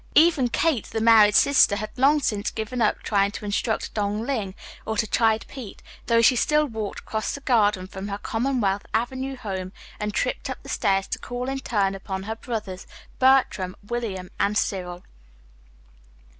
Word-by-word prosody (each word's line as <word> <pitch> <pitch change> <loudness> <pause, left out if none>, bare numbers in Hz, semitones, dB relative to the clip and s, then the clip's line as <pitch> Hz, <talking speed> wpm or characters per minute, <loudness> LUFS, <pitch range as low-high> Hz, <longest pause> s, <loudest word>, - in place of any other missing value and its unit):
Even 310 -5 +5
Kate, 255 0 +1
the 225 - -4
married 220 -2 +6
sister, 280 -7 +5
had 210 +1 -5
long 275 +4 +4
since 210 -5 -1
given 225 +3 -4
up 215 - +1
trying 200 -2 +2
to 210 +1 -8
instruct 210 +2 -1
Dong 210 +1 -1
Ling 215 -8 -2 0.3
or 220 0 -3
to 215 - +2
chide 220 0 +2
Pete, 250 -7 -10 0.2
though 230 -1 +4
she 250 - +6
still 300 +5 +2
walked 220 -6 -5
across 220 -1 -3
the 280 - -9
Garden 210 -8 +2
from 190 +1 -7
her 200 0 -3
Commonwealth 225 -4 -1
Avenue 260 +4 -2
home 190 -6 -5 0.3
and 210 -1 -2
tripped - - -2
up - - -4
the - - -11
stairs 195 0 +1
to - - -3
call 245 +1 -5
in 270 0 -2
turn 205 -7 0
upon 190 0 -5
her 220 +2 -4
brothers, 215 -5 -6 0.3
Bertram, 255 -8 +3
William, 205 -6 -4
and 205 +1 +1
Cyril. 180 -3 -2
220 Hz, 170 wpm, -24 LUFS, 200-245 Hz, 0.3 s, married